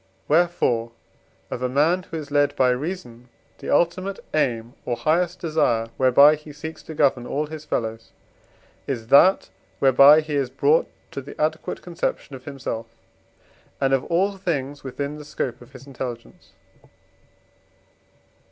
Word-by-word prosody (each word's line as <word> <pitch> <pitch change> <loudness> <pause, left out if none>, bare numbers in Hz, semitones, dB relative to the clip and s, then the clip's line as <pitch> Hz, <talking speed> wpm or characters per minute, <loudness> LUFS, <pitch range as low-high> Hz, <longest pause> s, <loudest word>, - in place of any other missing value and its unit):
Wherefore 145 -8 +1 0.6
of 125 - -4
a 125 - 0
man, 155 +8 +2
who 165 - -4
is 145 -2 -8
led 145 0 +2
by 130 -1 +3
reason, 125 -4 -5 0.3
the - - -7
ultimate 185 +5 +1 0.2
aim 120 -6 0
or 120 - -2
highest 165 +8 +1
desire, 120 -9 +1
whereby 135 +3 +6
he 150 0 -8
seeks 160 +2 -8
to 160 - -9
govern 135 -5 +2
all 150 +2 -1
his 155 0 -9
fellows, 115 -5 -3 0.8
is 120 -5 -4
that 185 +8 +5 0.3
whereby 140 +3 +7
he 155 -1 -6
is 140 -3 0
brought 140 +4 +2 0.2
to 140 - -5
the 135 - -12
adequate 155 +1 -2
conception 170 -5 -4
of 130 - -12
himself 135 -5 -5 0.9
and 135 -1 +1
of 135 - +2
all 195 +4 0
things 145 -6 -3
within 140 +3 -5
the - - -9
scope 140 -5 -4
of 120 +2 -16
his 130 0 -12
intelligence. 125 -3 -8
140 Hz, 145 wpm, -23 LUFS, 125-155 Hz, 0.9 s, whereby